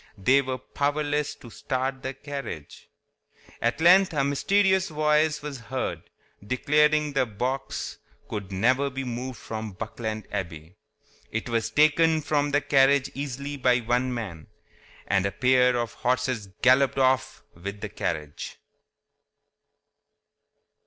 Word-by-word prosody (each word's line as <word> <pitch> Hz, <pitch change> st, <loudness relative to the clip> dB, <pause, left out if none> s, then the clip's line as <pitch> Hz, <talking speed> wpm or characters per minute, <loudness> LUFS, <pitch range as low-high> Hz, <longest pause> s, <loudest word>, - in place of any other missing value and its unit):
They 125 Hz, +8 st, +4 dB
were 130 Hz, -1 st, -3 dB
powerless 145 Hz, +2 st, -1 dB
to 120 Hz, -, -14 dB
start 130 Hz, +3 st, -3 dB
the 130 Hz, 0 st, -5 dB
carriage. 140 Hz, -, -7 dB, 0.7 s
At 120 Hz, +5 st, 0 dB
length 180 Hz, +2 st, +6 dB
a 140 Hz, -3 st, +1 dB
mysterious 190 Hz, +7 st, +2 dB
voice 150 Hz, 0 st, +2 dB
was 145 Hz, -3 st, -5 dB
heard, 130 Hz, +3 st, -4 dB, 0.4 s
declaring 150 Hz, +5 st, +2 dB
that 135 Hz, -, +1 dB
the 130 Hz, -, +3 dB
box 130 Hz, +6 st, -4 dB, 0.3 s
could 100 Hz, -2 st, -5 dB
never 130 Hz, +8 st, +2 dB
be 135 Hz, 0 st, -5 dB
moved 125 Hz, 0 st, -5 dB
from 110 Hz, -2 st, -6 dB
Buckland 110 Hz, +1 st, -5 dB
Abbey. 85 Hz, -2 st, -5 dB, 0.6 s
It 115 Hz, +2 st, -3 dB
was 115 Hz, -2 st, 0 dB
taken 155 Hz, +4 st, +4 dB
from 145 Hz, -1 st, +1 dB
the 145 Hz, +1 st, +2 dB
carriage 140 Hz, -1 st, +3 dB
easily 140 Hz, +1 st, -5 dB
by 125 Hz, -2 st, +3 dB
one 125 Hz, +2 st, 0 dB
man, 100 Hz, -11 st, -6 dB, 0.6 s
and 100 Hz, 0 st, +2 dB
a -, -, -3 dB
pair 125 Hz, +3 st, +3 dB
of 120 Hz, -2 st, -2 dB
horses 125 Hz, -4 st, -1 dB, 0.2 s
galloped 130 Hz, +1 st, +5 dB
off 130 Hz, 0 st, +1 dB
with 100 Hz, +4 st, -7 dB
the -, -, -4 dB
carriage. 75 Hz, -3 st, -4 dB
130 Hz, 130 wpm, -26 LUFS, 115-145 Hz, 0.7 s, length